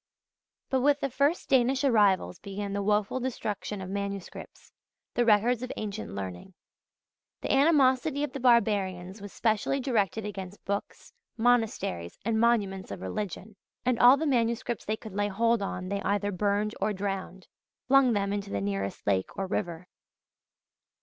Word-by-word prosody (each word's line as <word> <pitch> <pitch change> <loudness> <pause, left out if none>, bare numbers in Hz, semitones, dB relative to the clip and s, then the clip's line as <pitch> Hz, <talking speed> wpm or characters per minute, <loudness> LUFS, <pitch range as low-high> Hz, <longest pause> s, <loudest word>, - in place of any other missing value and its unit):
But 265 -1 +2
with 290 +2 +3
the 275 - -2
first 285 +7 +1
Danish 265 +1 +3
arrivals 205 -8 +3
began 200 0 -5
the 200 - -1
woeful 210 +4 +1
destruction 210 -5 -4
of 185 - -6
manuscripts, 200 -1 -6 0.4
the 240 - +2
records 230 +2 +3
of 255 - -4
ancient 210 - -5
learning. 95 - -7 0.9
The - - -2
animosity 280 0 +3
of 295 - -3
the 275 - -4
barbarians 200 -6 +2
was 205 -1 -8
specially 225 +6 0
directed 220 -5 0
against 195 -1 -7
books, 200 - -4 0.2
monasteries, 225 - 0
and 220 0 +1
monuments 205 -5 +1
of 100 - -6
religion: 195 - -5 0.3
and 250 -2 +1
all 250 +3 +8
the 315 - -2
manuscripts 235 -3 0
they 215 +1 -1
could 220 -3 -10
lay 205 +1 0
hold 230 +2 +1
on 185 -2 -4
they 200 0 -2
either 205 +1 0
burned 205 +2 0
or 215 - +1
"drowned" 190 -1 -4
i.e., - - -39 0.3
flung 265 -2 +5
them 200 -1 0
into 205 -1 -3
the 100 - -2
nearest 100 0 -3
lake 95 -2 +1
or 195 - -1
river. 180 -2 -3
210 Hz, 155 wpm, -28 LUFS, 195-245 Hz, 0.9 s, all